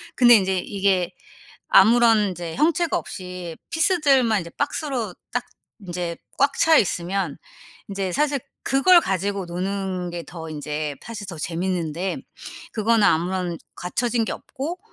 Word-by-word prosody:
근데 240 -2 +7
인제 190 -3 +2
이게 190 -2 0 0.6
아무런 225 0 +6
인제 170 -2 -6
형체가 330 +3 +2
없이 180 -3 -7
피스들만 280 - +3
이제 170 - -10
박스로 270 - -2 0.2
딱 245 0 -1 0.4
인제 175 -3 -4 0.2
꽉 280 0 +4
차 325 -1 +5
있으면 180 - 0 0.5
인제 195 -2 -3
사실 290 +4 +1 0.2
그걸 345 +7 +5
가지고 195 - -2
노는 185 0 -3
게 170 -1 -6
더 160 -2 -8
인제 150 -1 -4
사실 225 -3 -7
더 175 -4 -8
재미있는데 175 +1 -2 0.5
그거는 220 0 +2
아무런 175 +1 0 0.2
갖춰진 235 +6 -1
게 - - -2
없고 295 +6 -6
195 Hz, 275 characters per minute, -23 LUFS, 175-240 Hz, 0.6 s, 근데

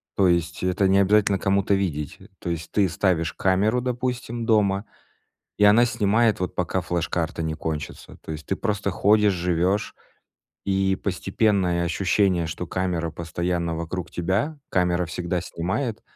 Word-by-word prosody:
То 95 - +4
есть 85 0 0
это 90 +1 +2
не 95 +1 +4
обязательно 100 0 +4
кому-то 100 +1 +2
видеть. 75 -7 -2 0.2
То - - -5
есть 85 -1 -4
ты 100 -3 +2
ставишь 85 -2 0
камеру, 100 +6 +2
допустим, 120 -2 -3
дома, 100 -3 +2 0.7
и - - +4
она 105 +4 +7
снимает 115 -1 +2
вот 90 - -3
пока 90 +1 -1
флеш-карта 85 -1 -2
не 80 0 -2
кончится. 75 -1 -6
То - - -5
есть 75 -1 -7
ты 95 - 0
просто 105 -2 -1
ходишь, 105 +2 +3
живешь, 90 +3 0 0.7
и 95 -1 +1
постепенное 95 -2 0
ощущение, 90 0 +1
что 85 +3 -5
камера 90 -2 -2
постоянно 85 +1 -2
вокруг 85 +2 -4
тебя, 100 - -1
камера 90 -1 +1
всегда 85 +1 -3
снимает, 95 +8 -3
95 Hz, 145 wpm, -24 LUFS, 85-105 Hz, 0.7 s, она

